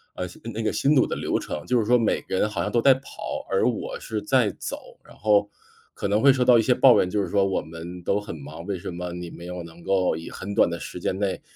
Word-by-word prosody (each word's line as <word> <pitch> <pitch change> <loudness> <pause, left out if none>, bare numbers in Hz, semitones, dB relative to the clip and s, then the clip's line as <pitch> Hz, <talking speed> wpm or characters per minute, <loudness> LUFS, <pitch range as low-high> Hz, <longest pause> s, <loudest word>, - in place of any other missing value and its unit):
嗯 90 - -3
新， - - -14
嗯， 115 - -4
那 115 - -3
个 - - +1
新 145 +2 +2
组 130 - +5
的 - - -3
流 - - 0
程。 75 - -5
就 125 -1 +3
是 110 - 0
说 125 +2 +5
每 115 - +1
个 95 - -3
人 105 - +2
好 95 -5 -3
像 - - -2
都 120 - +2
在 135 +1 +7
跑， 130 - -7
而 - - +3
我 - - -4
是 110 -2 -4
在 125 -6 +2
走， - - -5 0.3
然 - - -16
后 105 0 +3 0.4
可 - - -3
能 105 +2 +2
会 140 0 +7
受 130 -2 +1
到 120 -2 +7
一 - - +5
些 125 +3 +3
抱 125 0 +6
怨， 90 - +1
就 105 +1 0
是 - - -2
说 100 -1 +2
“我 95 - 0
们 85 +2 -9
都 100 +3 +1
很 105 - -7
忙， 80 +4 -9
为 100 -3 -3
什 - - -6
么 90 0 -5
你 90 -1 -6
没 85 - -10
有 90 0 -6
能 85 +1 -13
够 95 -4 +1
以 80 - -7
很 100 +2 -6
短 - - +4
的 85 - -4
时 - - -7
间 95 - -2
内， 100 -2 -1
100 Hz, 310 characters per minute, -25 LUFS, 90-115 Hz, 0.4 s, 在